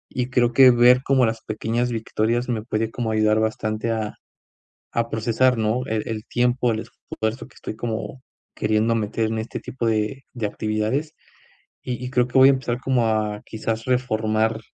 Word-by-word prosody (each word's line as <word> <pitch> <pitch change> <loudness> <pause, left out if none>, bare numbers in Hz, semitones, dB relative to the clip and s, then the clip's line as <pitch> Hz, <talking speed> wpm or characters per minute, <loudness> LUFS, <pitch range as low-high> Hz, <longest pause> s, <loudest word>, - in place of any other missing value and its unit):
y 125 0 -1
creo 120 -2 +2
que 135 -1 +8
ver 125 +1 +6
como 135 -2 +3
las 110 0 -2
pequeñas 115 +3 -2
victorias 115 +1 -1
me 115 -3 -1
puede 110 -1 -2
como 115 -2 -2
ayudar 110 0 +3
bastante 110 0 -1
a 110 -2 -2 0.8
a 115 0 -1
procesar, 115 +3 +2
¿no?, 115 +3 0
el 110 -2 -2
el 110 -1 -4
tiempo, 125 0 +1
el 110 - -1
esfuerzo 110 +1 -5
que - - -23
estoy - - -7
como 120 +3 -5 0.3
queriendo 110 +2 +1
meter 110 0 -1
en 110 - -2
este 110 - -5
tipo 125 -2 -5
de 110 +5 -1
de 120 -3 -3
actividades. 110 +9 -2 0.7
Y 125 0 -4
y 125 - -4
creo 125 -2 +2
que 125 - -4
voy 130 +1 +9
a - - +6
empezar 125 -2 -2
como 130 -3 +1
a 105 -1 -1
quizás, 110 0 -4
reformar 110 -3 0
115 Hz, 180 wpm, -23 LUFS, 110-125 Hz, 0.8 s, voy